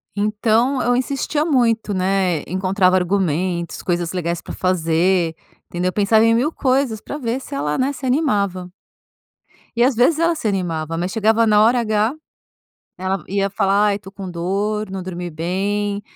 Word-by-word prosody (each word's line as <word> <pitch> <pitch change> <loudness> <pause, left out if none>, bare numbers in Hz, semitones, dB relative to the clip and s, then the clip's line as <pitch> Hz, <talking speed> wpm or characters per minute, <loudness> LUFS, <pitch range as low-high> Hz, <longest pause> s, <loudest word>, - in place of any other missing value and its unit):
Então, 220 +5 +1
eu 245 0 +2
insistia 280 +4 -1
muito, 230 -8 +1
né. 185 -3 +1
Encontrava 185 +1 +2
argumentos, 180 -2 -1
coisas 175 -2 -1
legais 170 -2 -2
pra - - -8
fazer, 170 -1 +1 0.3
entendeu? 180 +1 -2
Pensava 215 +2 +3
em 230 - +4
1000 280 +7 +1
coisas 260 -6 0
pra 290 - -7
ver 245 -1 -2
se - - -10
ela, 150 +2 -1
né, 275 +2 0
se 265 0 -7
animava. 200 - 0 1.1
E 235 - +4
às 260 -1 +3
vezes 290 +7 +3
ela 335 0 +2
se 265 - -3
animava, 165 -5 -2
mas 180 +2 -2
chegava 225 +1 +2
na 210 -1 +4
hora 240 +2 +4
H, 215 +2 +1 0.8
ela 190 +1 -2
ia 195 +1 0
falar: 200 +1 +2
"Ai, 205 0 0
tô 195 - -12
com 195 -2 -7
dor, 200 +4 -2
não 190 -1 -5
dormi 180 -1 -5
bem, 200 +5 -2
200 Hz, 165 wpm, -20 LUFS, 180-230 Hz, 1.1 s, em